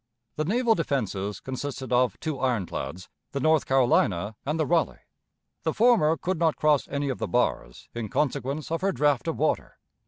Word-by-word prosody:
The 155 - -1
naval 230 +5 +3
defenses 105 - -2
consisted 130 0 -5
of 125 0 +2
two 155 -4 -3
ironclads, 95 - -2 0.3
the 140 - -1
North 155 +2 +3
Carolina 110 -6 +2
and 155 +3 -1
the 155 - +2
Raleigh. 165 +2 +1 0.6
The - - -2
former 210 -9 +4
could 185 -2 -2
not 165 -2 +2
cross 150 -2 +2
any 140 0 -2
of 130 - -3
the - - -2
bars 120 - -1
in 115 -3 -4
consequence 145 +3 -1
of 165 - -1
her 195 +1 +2
draught 145 -2 +1
of 165 - -1
water. 155 +1 -1
140 Hz, 175 wpm, -26 LUFS, 125-160 Hz, 0.6 s, former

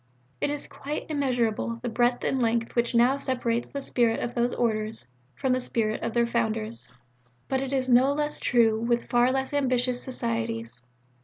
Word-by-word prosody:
It - - +1
is 290 0 -3
quite 295 +2 -5
immeasurable 245 -6 0
the - - -2
breadth 240 +1 +1
and 265 - 0
length 230 0 0
which 235 0 +1
now 245 +4 +4
separates 245 -4 -1
the 280 - -5
spirit 235 -4 +1
of 240 - -3
those 240 0 +1
Orders 220 - -1 0.3
from 265 -2 0
the 255 - +1
spirit 220 -3 -1
of 230 0 -2
their 235 -1 +3
Founders. 225 - -2 0.6
But 265 0 0
it 270 -1 -3
is 260 -2 0
no 255 +2 +5
less 295 +1 -1
true 225 -3 +3
with 235 0 +1
far 245 +1 +4
less 265 +1 -1
ambitious 255 -3 +1
Societies." 115 - -3
240 Hz, 175 wpm, -27 LUFS, 230-260 Hz, 0.6 s, no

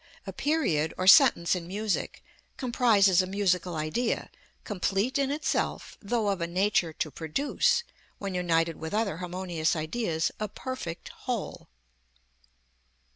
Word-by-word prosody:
A - - -6
period, 180 - 0
or 185 - -1
sentence, 180 -2 +7
in 175 -2 -3
music, 205 +2 -3 0.3
comprises 230 -8 +4
a 185 - -3
musical 180 -3 0
idea, 155 +11 -2 0.3
complete 205 +6 -1
in 275 -1 +1
itself, 295 +2 -2
though 220 0 0
of 195 -3 -1
a 170 - -1
nature 180 -1 +1
to 155 - -3
produce, 285 - 0 0.3
when 200 -2 -5
united 165 -2 +1
with 160 +5 -5
other 210 -7 0
harmonious 180 -2 -2
ideas, 160 0 -1
a 215 - -2
perfect 200 -6 -6
whole. 245 - -5
190 Hz, 130 wpm, -28 LUFS, 170-230 Hz, 0.3 s, sentence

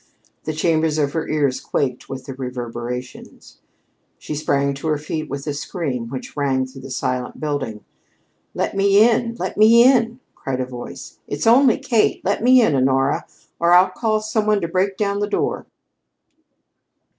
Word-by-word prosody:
The 155 - -2
chambers 155 0 +1
of 145 -2 0
her 160 - -2
ears 145 -4 0
quaked 130 -3 -2
with 130 -1 -7
the 135 - -6
reverberations. 125 -1 -7 0.6
She - - -7
sprang 140 -2 0
to 140 +4 -6
her 155 -1 +1
feet 155 +1 -5
with 140 0 -5
a 145 - -2
scream 140 - -4
which 130 +1 -7
rang 135 -3 0
through 130 +1 -12
the 135 - -9
silent 125 -1 -3
building. 145 -8 -4 0.7
"Let - - -2
me 200 +2 +5
in! 230 0 0
Let - - -5
me 225 +2 +7
in!" 240 -2 +3
called 130 -1 -4
a 130 - -1
voice. 125 -1 -9
"It's - - -3
only 245 +2 +5
Kate. 250 -9 0
Let 200 +3 0
me 250 +1 +6
in, 160 - +2
Honora, 135 +1 +1 0.3
or 170 +1 +3
I'll 185 +1 +6
call 215 +1 0
some 215 0 -1
one 210 -1 +3
to 170 - -1
break 190 +3 0
down 200 -1 -1
the 205 0 -1
door." - - -2
155 Hz, 170 wpm, -20 LUFS, 135-210 Hz, 0.7 s, me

